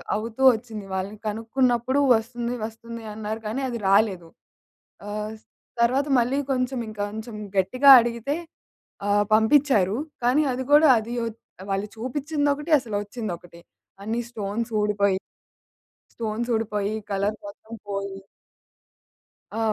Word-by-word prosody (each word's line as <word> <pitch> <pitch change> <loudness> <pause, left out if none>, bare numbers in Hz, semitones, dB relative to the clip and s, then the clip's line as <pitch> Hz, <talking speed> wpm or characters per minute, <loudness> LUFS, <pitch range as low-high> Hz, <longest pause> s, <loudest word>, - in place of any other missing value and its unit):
అవుతూ 225 +4 -5
ఒచ్చింది. 220 -3 -8
వాళ్ళని 195 +3 -4
కనుక్కున్నప్పుడు 240 +4 +1 0.2
వస్తుంది, 235 +2 -3
వస్తుంది 230 +1 -8
అన్నారు 215 +1 -4
కానీ 230 +6 -2
అది 235 -1 -4
రాలేదు. 195 -4 +2 0.8
ఆహ్, 210 +1 -4 0.5
తర్వాత 260 +5 +2
మళ్ళీ 250 +4 +1
కొంచెం 255 0 0
ఇంకొంచెం 215 +2 -5 0.2
గట్టిగా 255 +9 +6
అడిగితే 235 +4 -2 0.7
ఆహ్, 205 0 +3
పంపిచ్చారు. 220 -4 +4 0.3
కానీ 255 +5 +4
అది 255 +1 -3
గూడా 300 +1 +7
అది 225 +2 -5
ఒచ్ 225 0 -7 0.3
వాళ్ళు 195 +1 -1
చూపించిందొకటి, 290 +5 -1
అసలు 225 -5 -4
ఒచ్చిందొకటి. 180 -6 -7 0.4
అన్ని 225 +3 -2
స్టోన్స్ 220 +1 -3
ఊడిపోయి... 200 -2 +2 1.0
స్టోన్స్ 225 +1 -2
ఊడిపోయి, 210 -2 -1 0.2
కలర్ 200 +1 0
మొత్తం 210 +2 -11
పోయి 200 -1 -4 1.4
ఆ! - - -2
225 Hz, 115 wpm, -24 LUFS, 205-245 Hz, 1.4 s, గూడా